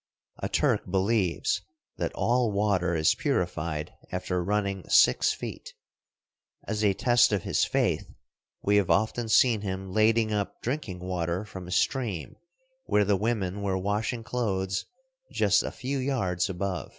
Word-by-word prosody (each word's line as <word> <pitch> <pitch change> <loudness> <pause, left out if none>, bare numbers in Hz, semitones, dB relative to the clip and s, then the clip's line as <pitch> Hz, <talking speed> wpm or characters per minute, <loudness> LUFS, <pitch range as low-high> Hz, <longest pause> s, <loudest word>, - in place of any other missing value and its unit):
A - - -3
Turk - - +1
believes 95 -1 +1 0.4
that - - -2
all 120 -1 +2
water 100 -4 +1
is 80 -1 +3
purified 75 -1 -2 0.2
after 90 -1 -2
running 100 -1 -1
six - - +5
feet. - - -7 0.9
As 110 -1 -2
a 100 -2 +3
test 120 +1 +4
of 100 -4 0
his - - +1
faith - - 0 0.5
we 105 +1 +3
have 100 -3 +2
often 110 +1 +1
seen 115 -1 +4
him 95 -1 -4
lading 110 +1 +3
up 100 -1 -2
drinking 115 -9 -3
water 90 +1 -2
from 95 -3 -9
a - - -8
stream 105 - -1 0.5
where 105 0 +2
the 100 0 +3
women 100 -2 -1
were 95 -2 0
washing 105 +5 -2
clothes 95 -6 -2 0.4
just - - +3
a - - -3
few 135 +1 -3
yards 95 -11 0
above. 95 -1 -3
100 Hz, 145 wpm, -27 LUFS, 95-110 Hz, 0.9 s, six